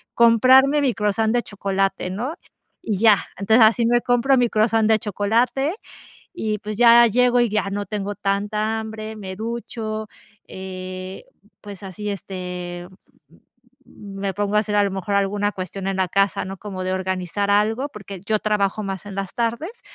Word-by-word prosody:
comprarme 260 Hz, +5 st, +5 dB
mi 265 Hz, -4 st, +2 dB
croissant 220 Hz, +1 st, 0 dB
de 245 Hz, -, +2 dB
chocolate, 195 Hz, -2 st, -2 dB
¿no? 245 Hz, -, -4 dB, 0.5 s
Y 205 Hz, -4 st, -2 dB
ya. 215 Hz, -3 st, +6 dB, 0.2 s
Entonces, 220 Hz, +4 st, +5 dB
así 230 Hz, +1 st, +3 dB
me 240 Hz, 0 st, +3 dB
compro 245 Hz, +3 st, +2 dB
mi 245 Hz, -2 st, +3 dB
croissant 220 Hz, 0 st, +2 dB
de 220 Hz, -1 st, +4 dB
chocolate, 230 Hz, -, 0 dB, 0.6 s
y 215 Hz, -10 st, -2 dB
pues, 210 Hz, +1 st, -6 dB
ya 235 Hz, 0 st, +8 dB
llego, 245 Hz, +2 st, +3 dB
y 240 Hz, -, +3 dB
ya 210 Hz, -2 st, 0 dB
no 205 Hz, 0 st, -3 dB
tengo 205 Hz, 0 st, -4 dB
tanta 210 Hz, +2 st, -1 dB
hambre, 220 Hz, 0 st, -7 dB
me 190 Hz, -3 st, -7 dB
ducho, 220 Hz, -1 st, -5 dB, 0.4 s
eh, 185 Hz, 0 st, -7 dB, 0.3 s
pues 205 Hz, -2 st, -10 dB
así, 205 Hz, +2 st, -5 dB
este 180 Hz, -2 st, -6 dB, 1.0 s
me 195 Hz, -1 st, -6 dB
pongo 205 Hz, 0 st, -1 dB
a -, -, +6 dB
hacer 210 Hz, -1 st, -2 dB
a 205 Hz, -, +4 dB
lo 200 Hz, -, -1 dB
mejor 195 Hz, +1 st, -3 dB
alguna 200 Hz, +1 st, +1 dB
cuestión 190 Hz, +1 st, -6 dB
en 195 Hz, -, -1 dB
la 190 Hz, -1 st, 0 dB
casa, 195 Hz, +2 st, +1 dB
¿no? 190 Hz, +1 st, -7 dB
Como 190 Hz, -2 st, -6 dB
de 185 Hz, -, -1 dB
organizar 190 Hz, +1 st, -2 dB
algo, 220 Hz, +7 st, +2 dB
porque 200 Hz, -5 st, -9 dB
yo 215 Hz, +1 st, +1 dB
trabajo 210 Hz, -1 st, 0 dB
más 195 Hz, 0 st, -5 dB
en 200 Hz, -, -7 dB
las 195 Hz, -1 st, -4 dB
tardes. 240 Hz, -, -3 dB
210 Hz, 170 wpm, -22 LUFS, 195-225 Hz, 1.0 s, ya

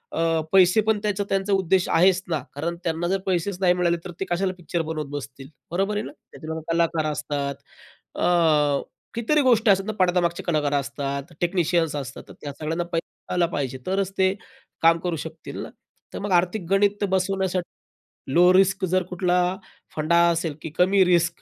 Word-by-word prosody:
अ, 165 Hz, -1 st, +1 dB
पैसेपण 205 Hz, +3 st, +4 dB
त्याचा 205 Hz, -1 st, 0 dB
त्यांचा 195 Hz, +1 st, 0 dB
उद्देश 190 Hz, -1 st, +2 dB
आहेच 185 Hz, +1 st, +4 dB
ना, 160 Hz, -3 st, 0 dB, 0.2 s
कारण 165 Hz, +4 st, -3 dB
त्यांना 170 Hz, 0 st, -1 dB
जर 195 Hz, +2 st, 0 dB
पैसेच 185 Hz, 0 st, -1 dB
नाही 180 Hz, -2 st, +5 dB
मिळाले, 175 Hz, -1 st, +1 dB
तर 180 Hz, -, -6 dB
ते 195 Hz, -, -1 dB
कशाला 185 Hz, +2 st, 0 dB
पिक्चर 170 Hz, 0 st, -3 dB
बनवत 155 Hz, -1 st, -3 dB
बसतील, 135 Hz, -2 st, -7 dB, 0.2 s
बरोबर 195 Hz, +4 st, 0 dB
आहे 210 Hz, -, -1 dB
ना. -, -, -7 dB, 0.2 s
त्या 160 Hz, 0 st, -6 dB
कलाकार 165 Hz, -1 st, +1 dB
असतात, 145 Hz, -1 st, -3 dB, 0.6 s
अ, -, -, 0 dB, 0.9 s
कितीतरी 295 Hz, +6 st, +2 dB
गोष्टी 230 Hz, -3 st, +4 dB
असतात 195 Hz, 0 st, +2 dB
ना 215 Hz, -, -2 dB
पडद्यामागचे 175 Hz, -2 st, +1 dB
कलाकार 150 Hz, -4 st, 0 dB
असतात, 140 Hz, +2 st, -3 dB
टेक्निशियन्स 170 Hz, -3 st, +1 dB
असतात. 135 Hz, -2 st, -6 dB
तर -, -, -12 dB
त्या 145 Hz, -, -5 dB
सगळ्यांना 160 Hz, +3 st, -2 dB
पैसा 165 Hz, 0 st, -5 dB
आला 175 Hz, -1 st, +3 dB
पाहिजे. 135 Hz, -5 st, -3 dB
तरच 195 Hz, 0 st, 0 dB
ते 190 Hz, 0 st, +3 dB, 0.5 s
काम 165 Hz, 0 st, +5 dB
करू 175 Hz, 0 st, -2 dB
शकतील -, -, -8 dB
ना. -, -, -8 dB, 0.4 s
तर -, -, -5 dB
मग 200 Hz, -1 st, -4 dB
आर्थिक 180 Hz, +2 st, +1 dB
गणित 205 Hz, +1 st, +2 dB
बसवण्यासाठी 190 Hz, -6 st, -3 dB
लो 180 Hz, +3 st, +6 dB
रिस्क 195 Hz, 0 st, +3 dB
जर 185 Hz, -1 st, +3 dB
कुठला 180 Hz, 0 st, +1 dB, 0.6 s
फंडा 155 Hz, +2 st, +2 dB
असेल, 165 Hz, -2 st, -1 dB
की 160 Hz, -, -5 dB
कमी 190 Hz, +2 st, +5 dB
रिस्क 175 Hz, -1 st, +2 dB
175 Hz, 170 wpm, -24 LUFS, 160-190 Hz, 0.9 s, लो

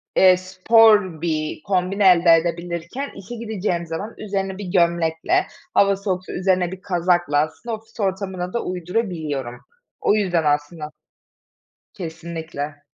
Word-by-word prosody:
eee, 185 Hz, -1 st, +6 dB
spor 190 Hz, -1 st, +4 dB
bir 155 Hz, -2 st, -2 dB
kombin 190 Hz, +1 st, -1 dB
elde 180 Hz, -4 st, +6 dB
edebilirken. 170 Hz, -, -3 dB
İşe 200 Hz, +5 st, -8 dB
gideceğim 210 Hz, -6 st, -2 dB
zaman 165 Hz, +7 st, -5 dB
üzerine 195 Hz, -2 st, -3 dB
bir 205 Hz, -, -6 dB
gömlekle, 170 Hz, -, +2 dB, 0.3 s
hava 200 Hz, 0 st, +4 dB
soğuksa 190 Hz, -2 st, -3 dB
üzerine 185 Hz, -1 st, +1 dB
bir 190 Hz, 0 st, -8 dB
kazakla 175 Hz, -4 st, +1 dB
aslında 160 Hz, +10 st, -2 dB
ofis 225 Hz, +2 st, -17 dB
ortamına 190 Hz, -2 st, -2 dB
da 235 Hz, -, -1 dB
uydurabiliyorum. 165 Hz, -, -3 dB, 0.4 s
O 210 Hz, -, +3 dB
yüzden 180 Hz, -6 st, +1 dB
aslında 150 Hz, +1 st, -1 dB, 1.0 s
Kesinlikle. 160 Hz, -4 st, -6 dB
180 Hz, 120 wpm, -22 LUFS, 165-200 Hz, 1.0 s, eee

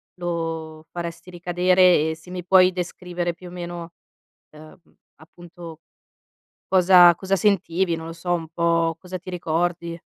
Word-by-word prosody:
lo 165 Hz, -2 st, -5 dB
faresti 170 Hz, +1 st, -7 dB
ricadere, 180 Hz, -2 st, +3 dB
e -, -, -5 dB
se 160 Hz, +3 st, -17 dB
mi 180 Hz, 0 st, -6 dB
puoi 185 Hz, 0 st, +5 dB
descrivere, 175 Hz, -1 st, -4 dB
più 180 Hz, +2 st, -13 dB
o -, -, -11 dB
meno, 175 Hz, -1 st, -7 dB, 0.6 s
uhm, 155 Hz, 0 st, -14 dB, 0.4 s
appunto, 165 Hz, 0 st, -13 dB, 0.9 s
cosa 180 Hz, -2 st, +6 dB
cosa 190 Hz, +2 st, -1 dB
sentivi, 185 Hz, -2 st, +1 dB
non 160 Hz, 0 st, -8 dB
lo 165 Hz, -, -6 dB
so, 175 Hz, +1 st, -3 dB
un 165 Hz, -2 st, -2 dB
po' 165 Hz, 0 st, 0 dB
cosa 185 Hz, +1 st, -7 dB
ti 180 Hz, -, -16 dB
ricordi? 170 Hz, -1 st, -2 dB
175 Hz, 140 wpm, -23 LUFS, 165-180 Hz, 0.9 s, cosa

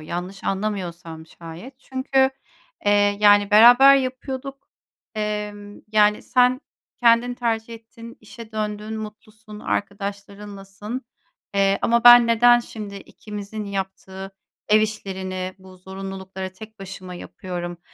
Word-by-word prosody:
yanlış 180 Hz, +5 st, -6 dB
anlamıyorsam 175 Hz, -5 st, -4 dB
şayet. 175 Hz, +13 st, -12 dB
Çünkü, 265 Hz, 0 st, 0 dB, 0.6 s
eee, 205 Hz, -, +5 dB, 0.3 s
yani, 205 Hz, -1 st, +5 dB
"Beraber 245 Hz, +6 st, +8 dB
yapıyorduk. 265 Hz, +1 st, -5 dB, 0.5 s
Emm, 210 Hz, -1 st, -5 dB
yani, 210 Hz, -1 st, +3 dB
sen 250 Hz, +1 st, +2 dB, 0.4 s
kendin 240 Hz, +1 st, +4 dB
tercih 230 Hz, -1 st, -2 dB
ettin, 230 Hz, +1 st, -13 dB
işe 220 Hz, +1 st, -12 dB
döndün, 215 Hz, 0 st, -4 dB
mutlusun, 215 Hz, 0 st, -11 dB
arkadaşlarınlasın, 200 Hz, +2 st, -5 dB, 0.5 s
eee, 195 Hz, 0 st, +2 dB
ama 235 Hz, 0 st, +2 dB
ben 240 Hz, -1 st, +9 dB
neden 240 Hz, +1 st, +5 dB
şimdi 210 Hz, -4 st, -8 dB
ikimizin 210 Hz, +1 st, -8 dB
yaptığı 190 Hz, 0 st, -6 dB, 0.4 s
ev 215 Hz, 0 st, +5 dB
işlerini, 190 Hz, -3 st, -4 dB
bu 185 Hz, 0 st, -15 dB
zorunlulukları 190 Hz, 0 st, -7 dB
tek 220 Hz, +3 st, -13 dB
başıma 185 Hz, -1 st, -9 dB
yapıyorum?" 175 Hz, -1 st, -7 dB
210 Hz, 105 wpm, -22 LUFS, 195-230 Hz, 0.6 s, ben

